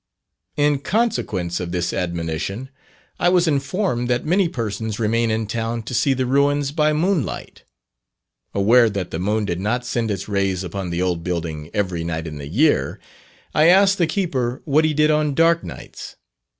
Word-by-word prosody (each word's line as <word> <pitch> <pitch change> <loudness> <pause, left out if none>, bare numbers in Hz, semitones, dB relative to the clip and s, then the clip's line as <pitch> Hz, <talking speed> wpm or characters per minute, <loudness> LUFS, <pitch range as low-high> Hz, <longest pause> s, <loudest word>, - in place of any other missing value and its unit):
In 145 -1 +2
consequence 140 - -1
of 90 -1 -4
this 85 -1 -1
admonition, 85 - -3 0.5
I 175 - +3
was 180 -1 +3
informed 140 - 0
that 120 -1 0
many 180 +2 +2
persons 110 -4 -3
remain 115 +1 +1
in 110 0 0
town 115 +2 -3
to 115 - -7
see 130 +4 +2
the 130 0 0
ruins 140 +2 +2
by 155 0 +2
moonlight. 160 - -2 0.9
Aware 115 +4 +5
that 100 -4 -4
the 80 - -3
moon 105 +3 0
did 85 -3 -2
not 120 +6 -1
send 120 -2 -1
its 100 -2 -3
rays 95 -2 0
upon 90 +1 -4
the 85 +1 -1
old 90 -2 -1
building 85 -3 -4
every 95 -5 -1
night 80 -1 -3
in 75 -2 -6
the 70 - -7
year, 140 - +1 0.5
I 155 +1 +5
asked 195 +2 +5
the 170 - +3
keeper 140 -9 -2
what 155 +1 +3
he 155 -1 0
did 150 +1 +4
on 150 -2 +1
dark 165 +1 +3
nights. - - -9
115 Hz, 175 wpm, -21 LUFS, 95-150 Hz, 0.9 s, Aware